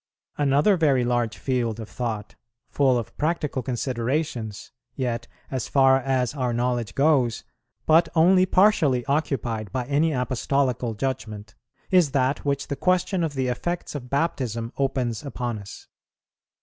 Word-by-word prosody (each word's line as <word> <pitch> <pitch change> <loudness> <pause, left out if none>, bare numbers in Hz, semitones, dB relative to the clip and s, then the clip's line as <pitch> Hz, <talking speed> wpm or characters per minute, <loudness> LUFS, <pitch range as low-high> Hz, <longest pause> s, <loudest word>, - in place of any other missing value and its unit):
Another 145 +7 +3
very 140 -7 +3
large 120 -2 0
field 120 -4 -1
of 110 - -6
thought, 110 -4 -4 0.4
full 135 -3 +3
of 115 -1 -5
practical 150 -4 -1
considerations, 125 -2 -3 0.2
yet, 120 -3 -2 0.2
as 130 -3 -2
far 135 -1 +5
as 130 -2 0
our 130 -4 -1
knowledge 120 -4 -1
goes, 135 -6 +2 0.4
but 165 +1 +5
only 185 +3 +5
partially 160 - +3
occupied 130 - -1
by 125 +1 -2
any 145 +4 +2
Apostolical 125 -2 -1
judgment, 105 -4 -4 0.4
is 175 -7 +4
that 135 0 +1
which 140 -1 -1
the 140 - -3
question 185 +2 +1
of 155 -3 -2
the 130 -1 0
effects 175 +8 -3
of 130 -4 -7
Baptism 125 -6 -1
opens 130 -4 -1
upon 125 -5 -4
us. 100 - -11
130 Hz, 135 wpm, -24 LUFS, 120-145 Hz, 0.4 s, far